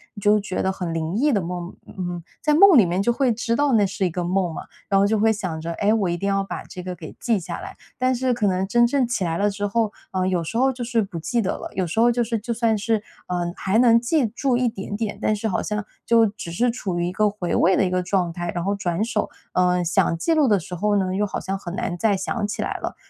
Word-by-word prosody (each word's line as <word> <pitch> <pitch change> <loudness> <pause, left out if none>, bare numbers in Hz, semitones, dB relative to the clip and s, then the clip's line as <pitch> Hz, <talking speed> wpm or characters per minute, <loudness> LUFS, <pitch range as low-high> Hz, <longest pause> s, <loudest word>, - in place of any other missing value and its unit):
你 205 - -9
就 210 +1 +4
觉 200 -2 -3
得 190 - +1
很 180 -3 -4
灵 165 +2 -2
异 290 +7 +3
的 215 - +2
梦， 175 +1 -5
嗯， 175 -2 -5 0.2
在 300 - +2
梦 365 +1 +8
里 215 - +7
面 175 +2 0
就 240 +4 +2
会 260 0 +2
知 230 +1 -1
道 285 +1 +2
那 210 -3 +4
是 195 0 -2
一 - - +1
个 175 +1 -3
梦 180 -1 0
嘛， - - -6 0.3
然 195 - +4
后 200 - +4
就 220 +1 +1
会 220 +1 +4
想 185 -7 -3
着， 165 +1 -4
哎， 205 +5 +2
我 205 -5 +1
一 175 - -1
定 200 - -2
要 195 0 +1
把 195 - -6
这 185 - -9
个 180 0 -5
给 160 -2 -10
记 230 -4 +1
下 170 - -6
来， - - -8 0.2
但 255 0 +2
是 255 0 0
可 225 -4 0
能 190 0 0
真 240 +4 +4
正 260 0 +1
起 240 -5 -1
来 165 -1 -1
了 205 +2 +2
之 205 0 -3
后， 220 +1 0 0.2
呃， 185 -1 0
有 180 -2 0
时 195 +8 -4
候 265 +2 +3
就 245 -1 -5
是 235 -1 +1
不 195 -5 -5
记 235 +9 0
得 190 - -2
了， - - -7
有 185 - -1
时 170 - -2
候 240 +1 +5
就 240 0 +1
是 230 0 -1
就 230 +3 -5
算 230 -1 +1
是， 220 +1 0 0.3
呃， 175 -1 -2
还 195 +3 0
能 235 -1 +6
记 265 +3 +2
住 250 +3 0
一 250 0 +2
点 200 -2 -4
点， 215 -2 -3
但 215 - +2
是 215 +2 -2
好 195 - 0
像 210 -1 -3 0.2
就 230 -1 +5
只 200 -4 -7
是 240 +9 +1
处 195 -7 -4
于 175 - 0
一 - - -2
个 210 +3 +2
回 200 -4 -3
味 185 +2 +4
的 - - +3
一 - - 0
个 180 0 0
状 180 -2 0
态， 175 0 -3
然 175 - -1
后 200 - 0
转 185 -1 -1
手， 220 -2 -1 0.2
嗯， 180 0 +2
想 165 0 +2
记 325 - +1
录 305 -3 +3
的 205 -4 +3
时 180 - -9
候 205 +4 +1
呢， 185 -1 0
又 205 +2 +1
好 200 - -4
像 195 +1 -3
很 175 -2 -7
难 175 -2 -3
再 205 +1 +2
想 205 +3 -2
起 210 - -4
来 - - -3
了。 - - -5
200 Hz, 310 characters per minute, -23 LUFS, 180-230 Hz, 0.3 s, 梦